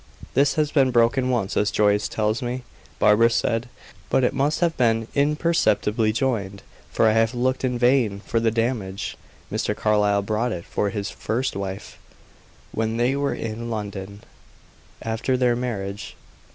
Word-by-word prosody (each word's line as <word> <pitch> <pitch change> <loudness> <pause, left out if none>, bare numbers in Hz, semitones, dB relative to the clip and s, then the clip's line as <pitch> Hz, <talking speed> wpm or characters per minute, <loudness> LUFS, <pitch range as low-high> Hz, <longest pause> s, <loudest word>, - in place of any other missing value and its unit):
"This 140 +2 +3
has 150 -1 +1
been 135 -3 +4
broken 120 +2 +2
once, 115 -6 -1
as 105 - +2
Joyce 105 0 +2
tells 110 +1 -1
me," 125 +1 -3 0.3
Barbara 115 +3 +5
said. 115 +1 0 0.4
"But 130 - +2
it 125 - +2
must 140 +3 0
have 170 -2 +2
been 115 -2 +1
imperceptibly 145 -7 +2
joined, 105 -5 -2 0.3
for 110 - +3
I - - +5
have 115 +2 +2
looked 130 +2 0
in 125 -1 0
vain 120 -5 +2
for 115 - -1
the 115 0 +2
damage. 115 -4 -2 0.4
Mr. - - -1
Carlyle 105 -1 +2
bought 110 +4 -1
it 85 -1 -6
for 100 - -1
his 105 -1 -4
first 125 +4 -2
wife, 100 0 -6 0.7
when 110 0 -1
they 120 +3 +2
were 140 0 -1
in 115 +1 -5
London, 100 -2 -6 0.8
after 115 +3 -1
their 125 -1 +2
marriage. 100 -5 -4
115 Hz, 155 wpm, -23 LUFS, 105-125 Hz, 0.8 s, Barbara